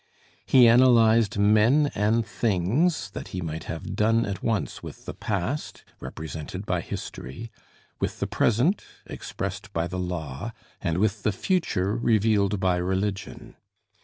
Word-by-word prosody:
He 125 -3 +7
analyzed 115 -3 +5
men 110 +8 +4
and 110 +3 +1
things 105 - 0
that - - -7
he 90 - -5
might 80 -1 -5
have 80 - -5
done 115 +2 +3
at 95 -2 -4
once 110 -4 -1
with - - -10
the - - -5
past, 105 +8 -3 0.2
represented 80 +5 -7
by 90 -3 0
history, 85 - -7 0.5
with - - -2
the - - 0
present, 125 - +2 0.2
expressed 100 +1 -6
by 85 0 0
the 90 +1 -4
law, 90 - -4 0.3
and 85 -3 -1
with 105 +1 +1
the 105 - +1
future 105 - 0
revealed 105 -4 +2
by 95 -1 +2
religion. 95 +2 -3
105 Hz, 135 wpm, -26 LUFS, 90-115 Hz, 0.5 s, He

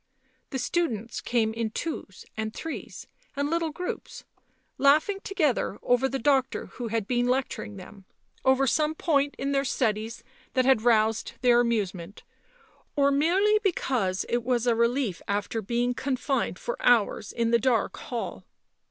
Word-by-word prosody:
The 265 - -3
students 245 -6 -2
came 225 -2 +1
in 225 -1 -2
twos 215 - -5
and 220 0 -3
threes 325 - -6 0.3
and 285 +2 -1
little 335 -1 +1
groups, 355 +4 -6 0.6
laughing 310 +8 +4
together 305 - 0
over 245 +2 +2
the 270 - -2
doctor 265 0 +1
who 245 -2 -6
had 225 -2 -1
been 245 -1 +1
lecturing 250 -5 -2
them, 195 +1 -12 0.4
over 265 +1 +4
some 305 +4 +1
point 285 -3 +1
in 275 +1 -2
their 275 0 +2
studies 230 -3 -1 0.3
that 255 -1 +3
had 265 -4 +4
roused 225 -1 +2
their 245 -1 +5
amusement, 200 -6 -2 0.7
or 280 -1 +4
merely 375 +9 +3
because 250 - 0
it 240 0 0
was 245 -1 0
a 240 - +4
relief 235 -4 0
after 205 +2 -1
being 240 +4 0
confined 270 +1 -1
for - - -5
hours 220 -3 +3
in 230 -1 0
the 235 - +5
dark 235 -2 +1
hall. 240 -3 -5
245 Hz, 150 wpm, -27 LUFS, 225-280 Hz, 0.7 s, their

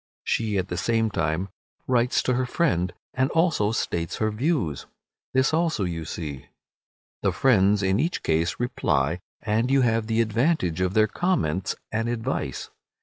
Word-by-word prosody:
She 110 -3 0
at 95 0 -1
the 90 - -3
same 115 +3 +1
time 85 +2 -1 0.4
writes 125 -1 +2
to 125 - +1
her 125 +1 0
friend, 105 - +1 0.2
and 130 +1 +1
also 160 - +2
states 85 -6 -2
her 110 0 0
views. 105 - -1 0.5
This 130 +3 +3
also 160 - +1
you 85 -3 -3
see. 70 -5 -6 0.7
The - - +2
friends 105 -5 +3
in 95 +2 +2
each 165 +6 -1
case 85 +3 0
reply, 85 - 0 0.2
and 110 +3 +1
you 135 0 +4
have 115 -2 +1
the 115 0 0
advantage 110 - +1
of 95 +1 0
their 110 0 +6
comments 100 - 0 0.2
and 115 +2 -1
advice. 120 - -3
110 Hz, 155 wpm, -25 LUFS, 90-125 Hz, 0.7 s, their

